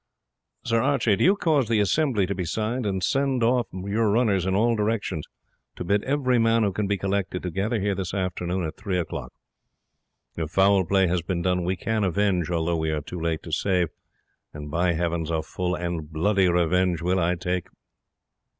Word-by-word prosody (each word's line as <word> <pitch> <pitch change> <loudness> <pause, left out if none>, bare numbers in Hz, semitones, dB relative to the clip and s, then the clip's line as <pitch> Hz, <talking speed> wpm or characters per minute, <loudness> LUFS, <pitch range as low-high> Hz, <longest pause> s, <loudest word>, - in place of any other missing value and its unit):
"Sir 115 0 +2
Archie, 120 -5 +2
do - - 0
you 190 +4 +5
cause 155 - +1
the 115 -2 +3
'assembly' 105 0 +2
to 100 - -2
be 95 -1 -3
sounded, 110 +6 -2
and 95 -1 -2
send 135 -3 +1
off 120 +1 +2
your 100 +4 -1
runners 100 -5 +2
in 95 - +1
all 115 +3 +3
directions 105 -7 -1 0.5
to - - -5
bid 100 +3 +1
every 130 -3 +1
man 115 0 +3
who 100 - +1
can 105 +1 -1
be 100 0 0
collected 95 -2 -2
to 90 - -3
gather 105 +6 -1
here 100 0 0
this 95 -2 -3
afternoon 90 -1 -2
at 80 0 -6
three 95 -2 -2
o 90 - 0
clock. - - -7 1.0
If 80 -2 -3
foul 95 +1 +3
play 95 +2 +3
has 90 0 0
been 85 0 -3
done 90 0 +1
we 90 +2 0
can 110 +3 -1
avenge, 95 -2 +1
although 85 0 0
we 80 0 -1
are 75 -1 -1
too 85 +4 -7
late 80 -1 -2
to 80 - -8
save, 90 +1 +1 0.7
and, 75 -1 -7
by 85 +2 +1
Heavens, 85 -1 -1
a 80 -1 -1
full 90 +2 -2
and 85 -3 -4
bloody 95 +4 +2
revenge 90 0 +1
will 90 +2 +1
I 90 +1 +1
take." 90 0 -2
95 Hz, 200 wpm, -25 LUFS, 85-105 Hz, 1.0 s, you